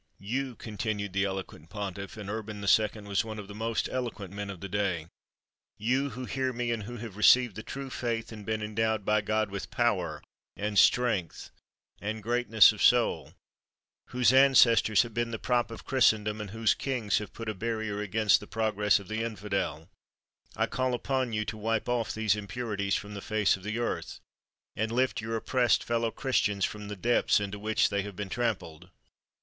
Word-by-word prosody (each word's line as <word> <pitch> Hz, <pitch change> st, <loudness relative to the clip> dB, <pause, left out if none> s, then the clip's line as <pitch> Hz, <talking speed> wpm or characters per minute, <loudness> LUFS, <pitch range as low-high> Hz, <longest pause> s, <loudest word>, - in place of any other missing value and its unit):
"You," 125 Hz, +5 st, -3 dB
continued 105 Hz, -2 st, -4 dB
the 100 Hz, +1 st, +1 dB
eloquent 95 Hz, -5 st, -6 dB
pontiff 100 Hz, 0 st, -6 dB
(and 105 Hz, -2 st, -7 dB
Urban 110 Hz, 0 st, -5 dB
II. 105 Hz, +1 st, +3 dB
was 100 Hz, -1 st, 0 dB
one 110 Hz, -1 st, -7 dB
of 105 Hz, -2 st, -7 dB
the 100 Hz, -, -9 dB
most 115 Hz, +1 st, -1 dB
eloquent 115 Hz, -7 st, -4 dB
men 100 Hz, 0 st, -5 dB
of 95 Hz, -3 st, -7 dB
the 100 Hz, -, -6 dB
day), 95 Hz, -5 st, -1 dB, 0.7 s
"you, 130 Hz, +6 st, +1 dB
who 130 Hz, -1 st, -6 dB
hear 130 Hz, 0 st, -1 dB
me, 120 Hz, -1 st, -2 dB
and 115 Hz, -2 st, -1 dB
who 120 Hz, +3 st, -7 dB
have 110 Hz, -4 st, -8 dB
received 120 Hz, +1 st, +5 dB
the 110 Hz, -, -5 dB
true 135 Hz, +3 st, -7 dB
faith, 115 Hz, -2 st, -3 dB
and 105 Hz, -2 st, -9 dB
been 110 Hz, 0 st, -2 dB
endowed 110 Hz, -1 st, -1 dB
by 105 Hz, 0 st, +3 dB
God 110 Hz, 0 st, 0 dB
with 100 Hz, -1 st, -5 dB
power, -, -, 0 dB, 0.3 s
and 105 Hz, -1 st, +1 dB
strength, 115 Hz, -9 st, +2 dB, 0.5 s
and 110 Hz, +1 st, -4 dB
greatness 115 Hz, -2 st, +5 dB
of -, -, -8 dB
soul, -, -, +3 dB, 0.7 s
whose 125 Hz, 0 st, +3 dB
ancestors 120 Hz, -6 st, +6 dB
have 115 Hz, -2 st, -9 dB
been 120 Hz, +1 st, -1 dB
the 115 Hz, -, -3 dB
prop 120 Hz, +1 st, 0 dB
of 115 Hz, -5 st, -9 dB
Christendom, 110 Hz, -5 st, +2 dB
and 105 Hz, -, -6 dB
whose 110 Hz, +2 st, +2 dB
kings 120 Hz, -8 st, -1 dB
have 105 Hz, -, -7 dB
put 115 Hz, -, -8 dB
a 110 Hz, -, -1 dB
barrier 110 Hz, 0 st, -3 dB
against 105 Hz, +1 st, +3 dB
the 105 Hz, -, -11 dB
progress 105 Hz, -2 st, +2 dB
of 100 Hz, -, -12 dB
the 110 Hz, +2 st, -2 dB
infidel, 100 Hz, -7 st, -3 dB, 0.7 s
I -, -, +2 dB
call 130 Hz, -1 st, -1 dB
upon 130 Hz, 0 st, -1 dB
you 110 Hz, -1 st, -1 dB
to 110 Hz, -, -5 dB
wipe 110 Hz, +1 st, -1 dB
off 120 Hz, -2 st, 0 dB
these 110 Hz, -2 st, +1 dB
impurities 105 Hz, -2 st, -2 dB
from 105 Hz, 0 st, -5 dB
the 100 Hz, -, -6 dB
face 110 Hz, -2 st, +2 dB
of 95 Hz, -, -12 dB
the 105 Hz, +4 st, -3 dB
earth, 120 Hz, -, -3 dB, 0.6 s
and 110 Hz, +1 st, -1 dB
lift 125 Hz, -1 st, +1 dB
your 110 Hz, +1 st, -3 dB
oppressed 120 Hz, +2 st, +2 dB
fellow 115 Hz, -1 st, 0 dB
Christians 110 Hz, -6 st, 0 dB
from 105 Hz, -1 st, -6 dB
the 105 Hz, -, -5 dB
depths 120 Hz, +4 st, +2 dB
into 100 Hz, 0 st, -4 dB
which 110 Hz, +1 st, +2 dB
they 100 Hz, -1 st, 0 dB
have 100 Hz, 0 st, -7 dB
been 100 Hz, +1 st, -5 dB
trampled. 90 Hz, -8 st, -3 dB
110 Hz, 190 wpm, -29 LUFS, 100-115 Hz, 0.7 s, ancestors